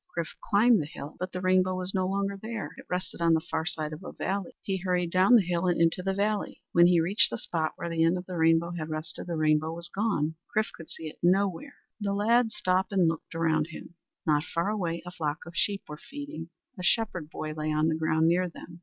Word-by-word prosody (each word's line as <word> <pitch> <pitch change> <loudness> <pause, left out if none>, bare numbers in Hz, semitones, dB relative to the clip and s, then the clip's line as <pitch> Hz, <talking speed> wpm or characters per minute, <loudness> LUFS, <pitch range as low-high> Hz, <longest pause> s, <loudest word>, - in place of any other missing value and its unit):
Chrif 170 -1 -2
climbed 215 0 +4
the 145 - -5
hill, 145 0 -8
but 185 0 -3
the 180 - -4
rainbow 185 0 +3
was 185 +1 -3
no 185 -2 +1
longer 200 +1 -1
there. 220 +2 -5
It - - -13
rested 180 -1 -3
on 165 -1 +5
the - - +3
far 160 0 -3
side 155 -1 -1
of 155 +5 -9
a - - -6
valley. 195 -2 -3
He 195 -1 -1
hurried 180 -2 0
down 185 +7 +6
the 220 - +6
hill 175 +1 0
and 175 - +2
into 165 +2 +3
the 195 +1 -1
valley. 205 +1 -1
When 170 0 +6
he 175 -1 +5
reached 180 +6 +3
the - - -3
spot 160 -7 -2
where - - -5
the 165 -1 +1
end 165 +2 +3
of 180 - -6
the 180 - -6
rainbow 165 +1 +3
had 160 -3 -5
rested, 155 +2 -5
the 170 - -2
rainbow 155 0 +2
was 170 0 -5
gone. 195 -7 0 0.2
Chrif 215 - +2
could 165 - -11
see - - -7
it 155 - -10
nowhere. 185 0 +1 0.2
The 200 -2 -1
lad 230 +3 +3
stopped 185 -1 +1
and 190 -4 +3
looked 165 0 -3
around 160 -2 +1
him. 170 0 -10 0.3
Not 150 -2 +3
far 170 +4 -1
away 170 -5 -2
a 175 - -6
flock 150 -4 -3
of 170 - -10
sheep 200 +3 0
were 150 0 -8
feeding. 275 - -7 0.3
A - - -5
shepherd 180 -6 +1
boy 155 -1 -5
lay 155 0 -2
on 155 +1 +2
the 160 - +2
ground 160 0 +2
near 180 +2 +2
them. 170 0 -12
175 Hz, 240 wpm, -28 LUFS, 160-195 Hz, 0.3 s, down